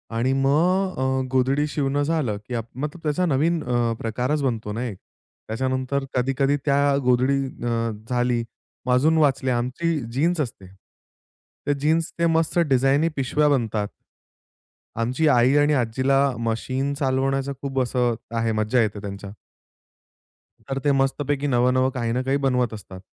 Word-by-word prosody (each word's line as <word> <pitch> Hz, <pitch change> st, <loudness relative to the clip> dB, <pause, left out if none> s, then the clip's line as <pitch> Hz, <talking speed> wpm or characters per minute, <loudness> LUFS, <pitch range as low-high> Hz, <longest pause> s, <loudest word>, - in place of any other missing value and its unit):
आणि 125 Hz, +3 st, +1 dB
मग 175 Hz, +8 st, +2 dB
अ, 130 Hz, 0 st, +1 dB
गोधडी 135 Hz, +3 st, +2 dB
शिवणं 145 Hz, -1 st, -1 dB
झालं, 145 Hz, -9 st, 0 dB
की 125 Hz, -, -6 dB
आप 115 Hz, -1 st, -3 dB
मतलब 150 Hz, +4 st, -5 dB
त्याचा 155 Hz, +4 st, 0 dB
नवीन 160 Hz, +2 st, +1 dB
अ, 120 Hz, -1 st, 0 dB
प्रकारच 125 Hz, +6 st, -1 dB
बनतो 110 Hz, -5 st, -2 dB
ना 120 Hz, +3 st, -3 dB
एक. 105 Hz, -6 st, -5 dB, 0.5 s
त्याच्यानंतर 130 Hz, +3 st, -1 dB
कधी-कधी 135 Hz, +2 st, +1 dB
त्या 140 Hz, 0 st, +3 dB
गोधडी 125 Hz, +2 st, +3 dB, 0.3 s
अ, 115 Hz, -1 st, 0 dB, 0.2 s
झाली, 120 Hz, -1 st, +1 dB, 0.4 s
मग 125 Hz, -, +2 dB
आजून 155 Hz, +6 st, +3 dB
वाचल्या 135 Hz, -4 st, +2 dB
आमची 150 Hz, +7 st, -1 dB
जीन्स 165 Hz, +6 st, +1 dB
असते. 105 Hz, -8 st, -6 dB, 1.0 s
तर 145 Hz, -, +3 dB
जीन्स 160 Hz, +2 st, +1 dB
ते 170 Hz, -, +3 dB
मस्त 165 Hz, +1 st, +1 dB
डिझायनी 135 Hz, +4 st, +3 dB
पिशव्या 145 Hz, +3 st, +1 dB
बनतात. 110 Hz, -6 st, 0 dB, 1.1 s
आमची 125 Hz, +7 st, +1 dB
आई 125 Hz, 0 st, +4 dB
आणि 145 Hz, +1 st, +4 dB
आजीला 130 Hz, +2 st, +1 dB, 0.2 s
मशीन 130 Hz, +5 st, -2 dB
चालवण्याचा 135 Hz, 0 st, 0 dB
खूप 135 Hz, -1 st, -2 dB
असं 125 Hz, -1 st, +1 dB, 0.2 s
आहे, 115 Hz, 0 st, +1 dB
मज्जा 110 Hz, +3 st, +1 dB
येते 105 Hz, -1 st, -1 dB
त्यांच्या. 100 Hz, -1 st, -7 dB, 1.3 s
तर 135 Hz, +4 st, -3 dB
ते 145 Hz, -, +3 dB
मस्तपैकी, 140 Hz, +1 st, 0 dB
नवं-नवं 130 Hz, +1 st, +2 dB
काही 120 Hz, -3 st, -2 dB
ना 125 Hz, +2 st, 0 dB
काही 135 Hz, +2 st, +1 dB
बनवत 125 Hz, -3 st, +1 dB
असतात. 95 Hz, -3 st, -9 dB
130 Hz, 145 wpm, -23 LUFS, 120-145 Hz, 1.3 s, आई